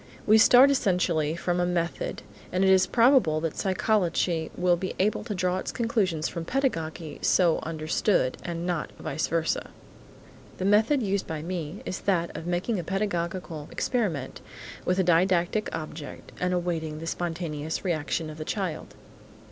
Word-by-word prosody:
We 215 +1 +6
start 250 +5 +7
essentially 175 - +1
from 175 +1 -1
a 175 - +2
method, 170 -1 -2 0.3
and 185 +1 +1
it 190 - +5
is 190 -1 +5
probable 230 - +4
that 165 -1 -2
psychology 180 -4 0
will 180 -1 +3
be 185 +2 -4
able 210 +3 +1
to 215 -4 -3
draw 185 0 0
its - - -4
conclusions 195 -9 0
from 170 - -5
pedagogy 165 - -2
so 175 -3 +3
understood, 155 -2 0
and 170 0 -4
not 175 -4 -2
vice 155 - -2
versa. 165 0 -1 0.9
The 185 - -3
method 220 +7 +3
used 200 -1 -1
by 155 -1 -4
me 170 +1 -5
is 185 - -4
that 175 -4 0
of 165 +2 -6
making 180 +4 -1
a - - -3
pedagogical 175 -4 -3
experiment 175 - -2 0.4
with 180 - +1
a 190 - +3
didactic 175 +3 +2
object 155 -1 -7
and 180 0 0
awaiting 170 -3 -2
the 160 - -7
spontaneous 165 -2 -3
reaction 155 -2 -1
of 155 - -11
the - - -3
child. 180 -2 -4
175 Hz, 155 wpm, -27 LUFS, 160-195 Hz, 0.9 s, start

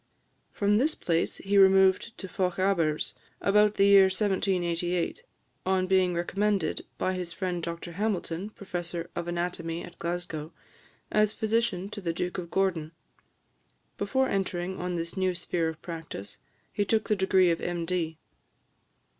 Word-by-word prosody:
From 205 +1 +2
this 305 +5 +2
place 165 -1 0
he 200 +1 +2
removed 190 +3 +5
to 190 - -7
Fochabers, 180 -4 0 0.3
about 210 +1 +4
the 195 - +4
year 200 -1 +8
1788, 180 - 0 0.4
on 185 0 +2
being 185 -1 +3
recommended, 200 +3 0
by 185 - 0
his 180 -2 -4
friend 180 -2 -2
Dr 170 +1 -5
Hamilton, 195 -1 -2
Professor 175 -4 -5
of 170 - -3
Anatomy 170 -1 -2
at 175 -1 -12
Glasgow, 170 -2 -4 0.6
as 215 0 +3
physician 220 -4 0
to 205 - -7
the 170 -3 -1
Duke 180 +3 -2
of 170 -2 -6
Gordon. 170 -5 0 1.1
Before 265 0 +1
entering 190 -2 -2
on 180 0 -2
this 170 +1 -4
new 185 -1 +1
sphere 170 -1 -1
of 160 -1 -8
practice, 160 - -7 0.3
he 205 - +1
took 215 +2 +1
the 210 - +3
degree 190 -2 +4
of 165 - -1
M. 175 -1 -2
185 Hz, 140 wpm, -28 LUFS, 170-195 Hz, 1.1 s, year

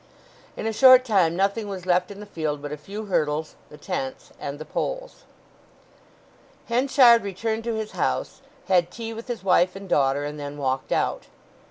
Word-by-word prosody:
In - - -4
a 225 - -1
short 255 +2 +7
time 185 -8 +2
nothing 200 +3 0
was 190 -3 -6
left 180 0 +2
in 200 0 -10
the - - -8
field 155 -7 -3
but 145 0 -7
a - - -3
few 200 +9 -8
hurdles, 155 -5 -1 0.2
the 150 - -13
tents, 135 -2 -5
and 140 0 -5
the 155 - -8
poles. - - -5 1.4
Henchard 245 -1 +5
returned 220 +3 -3
to 230 -1 -1
his 220 -1 -4
house, - - -2 0.3
had 175 -2 +3
tea 225 +3 -6
with 225 +1 -9
his 240 -6 -5
wife 180 -1 +3
and 195 0 -9
daughter, 140 -3 +2
and 150 +1 -6
then 145 0 -6
walked 130 -2 -2
out. - - -1
195 Hz, 180 wpm, -24 LUFS, 150-225 Hz, 1.4 s, short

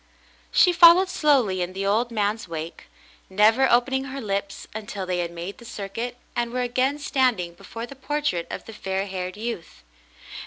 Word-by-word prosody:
She 360 - +5
followed 345 +2 +8
slowly 265 - +2
in 180 +1 -3
the 195 +1 -3
old 220 +5 +2
man's 215 -2 -1
wake, 165 0 -7 0.4
never 220 +7 +4
open 245 +2 +3
ing 265 0 +1
her 275 0 -6
lips 200 -4 -3
until 205 -3 -5
they 180 -1 -1
had 170 -1 -1
made 170 +3 -7
the - - -13
circuit 230 +3 -5 0.2
and 235 -1 -1
were 250 0 -1
again 255 +3 0
standing 250 -11 0
before 225 +6 -8
the 275 - -11
portrait 280 - -2
of - - -6
the 225 - -10
fair 195 -2 -2
haired 185 -1 -5
youth. 210 - -6
220 Hz, 180 wpm, -24 LUFS, 190-255 Hz, 0.4 s, followed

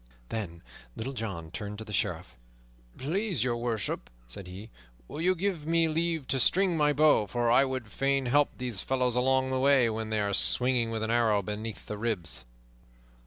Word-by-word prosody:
Then 85 -7 -5 0.3
Little 130 +5 -4
John 95 -10 -5
turned 105 -1 -5
to 110 - -6
the 105 - -8
Sheriff. - - -2 0.6
"Please 185 - -1
Your 125 -2 0
Worship," 115 -3 -3 0.2
said 90 +11 -9
he, 95 +5 -10 0.4
"will 155 - -6
you 185 +2 +3
give 175 -4 -2
me 165 0 +3
leave 160 -1 -1
to 135 - +2
string 185 - +4
my 150 -2 +3
bow? 145 -7 +4
For 120 +1 0
I 135 +3 +6
would 130 -5 -4
fain 135 +1 0
help 145 +4 +2
these 125 -6 0
fellows 125 -2 0
along 130 +1 +2
the 130 - 0
way, 130 -3 +4
when 110 0 -4
they 110 0 0
are 100 -1 -1
swinging, 125 +2 +2
with 110 -1 -3
an 110 - -1
arrow 110 -4 +2
beneath 105 +2 -5
the 105 - -6
ribs." 90 - -2
120 Hz, 185 wpm, -29 LUFS, 110-140 Hz, 0.6 s, I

